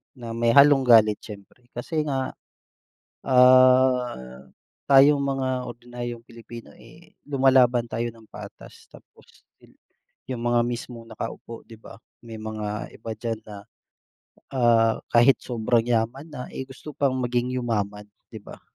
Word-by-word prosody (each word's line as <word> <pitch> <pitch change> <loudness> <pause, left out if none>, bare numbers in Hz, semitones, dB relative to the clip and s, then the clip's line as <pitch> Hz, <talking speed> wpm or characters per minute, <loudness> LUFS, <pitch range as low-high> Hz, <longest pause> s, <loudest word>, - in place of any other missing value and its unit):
na 120 -2 -8
may 115 0 0
halong 140 -2 +6
galit 110 -3 +5
siyempre 105 +4 -14
kasi 155 +6 -3
nga, 135 -2 -2 0.9
ah, 125 - +3 0.4
tayong 140 +1 +5
mga 135 -1 -2 0.2
ordinaryong 120 0 -8
Pilipino 115 0 -12
eh - - -19
lumalaban 130 -4 +3
tayo 120 +1 -3
ng 115 -1 -19
patas. - - -12
Tapos - - -19 0.3
sil - - -22 0.6
yung 120 -2 -5
mga 120 0 +2
mismong 120 -1 -5
nakaupo 115 +1 -8
di 115 -1 -15
ba, 95 - -13 0.2
may 115 -1 -10
mga 110 -1 -6
iba 115 +1 -9
diyan 115 -1 -4
na, 105 - -9 1.0
ah, 115 -3 +3 0.2
kahit 120 +3 +4
sobrang 115 -1 0
yaman 120 +6 -2
na, 130 -4 -8
eh, 130 - -5
gusto 145 +3 -11
pang 135 -2 0
maging 125 0 -2
yumaman 105 -4 -3 0.2
di 110 - -10
ba? 100 - -14
120 Hz, 135 wpm, -24 LUFS, 115-130 Hz, 1.0 s, halong